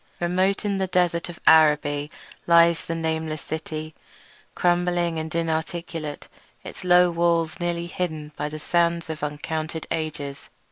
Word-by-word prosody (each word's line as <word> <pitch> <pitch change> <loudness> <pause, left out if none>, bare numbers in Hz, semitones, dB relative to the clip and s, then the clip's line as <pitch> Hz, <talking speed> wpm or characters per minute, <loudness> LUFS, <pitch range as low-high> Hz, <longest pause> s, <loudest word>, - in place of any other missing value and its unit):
Remote 185 +4 +1
in 200 -1 0
the 190 - 0
desert 175 -2 +1
of 175 - -9
Araby 150 -2 +4 0.4
lies 170 0 +5
the 165 - -3
nameless 160 -1 -2
city, 155 0 -5 0.6
crumbling 175 -1 +1
and 160 0 -5
inarticulate, 165 -1 -3 0.4
its - - -9
low 180 0 +5
walls 170 -1 +1
nearly 170 -1 -1
hidden 160 -4 -4
by 150 - -3
the 155 - -6
sands 170 +1 0
of 155 - -7
uncounted 155 +2 -3
ages. 150 -3 -4
165 Hz, 135 wpm, -24 LUFS, 155-175 Hz, 0.6 s, lies